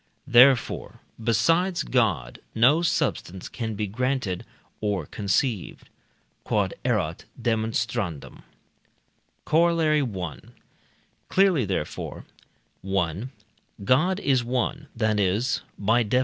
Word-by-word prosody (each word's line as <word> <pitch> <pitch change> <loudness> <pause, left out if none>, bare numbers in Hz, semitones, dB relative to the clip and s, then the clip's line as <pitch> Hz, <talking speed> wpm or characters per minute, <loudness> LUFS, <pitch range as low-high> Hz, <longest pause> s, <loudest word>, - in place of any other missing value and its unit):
Therefore, 125 0 +4 0.2
besides 165 - +2
God 90 - 0 0.2
no 130 +9 +5
substance 95 - -1
can 110 -3 -4
be 105 +1 -2
granted 115 -2 -2 0.4
or 100 -6 -1
conceived. 105 - -2 0.6
Q.E.D. - - +1 2.7
Corollary 160 -2 +3
I. 95 - -4 0.9
Clearly, 185 - +3
therefore: 95 -6 -4 0.6
1. 95 +4 -2 0.5
God 155 - +3
is 130 -7 +2
one, 130 +4 -2
that 110 -2 +1
is 105 +3 +1 0.2
(by 115 +4 +2
Def. 115 +3 +2
120 Hz, 85 wpm, -25 LUFS, 100-140 Hz, 2.7 s, no